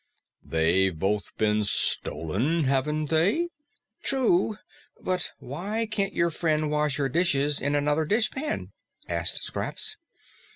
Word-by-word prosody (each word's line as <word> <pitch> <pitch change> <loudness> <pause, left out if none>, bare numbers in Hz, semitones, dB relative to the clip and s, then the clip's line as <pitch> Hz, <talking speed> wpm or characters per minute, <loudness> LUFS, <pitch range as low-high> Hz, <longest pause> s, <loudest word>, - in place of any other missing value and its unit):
"They've 85 +2 +2
both 100 +5 -2
been 105 0 +2
stolen, 105 - +1
haven't 145 +3 0
they?" 200 - +2 0.5
"True. 225 -6 +2 0.4
But 185 -1 +2
why 200 - -3
can't 200 -2 -1
your 170 0 +2
friend 155 -2 0
wash 150 -2 +1
her 140 -2 +1
dishes 145 -1 +1
in 145 +2 0
another 145 +2 +1
dishpan?" 240 - -1 0.4
asked - - 0
Scraps. 435 0 -2
150 Hz, 115 wpm, -26 LUFS, 130-185 Hz, 0.5 s, They've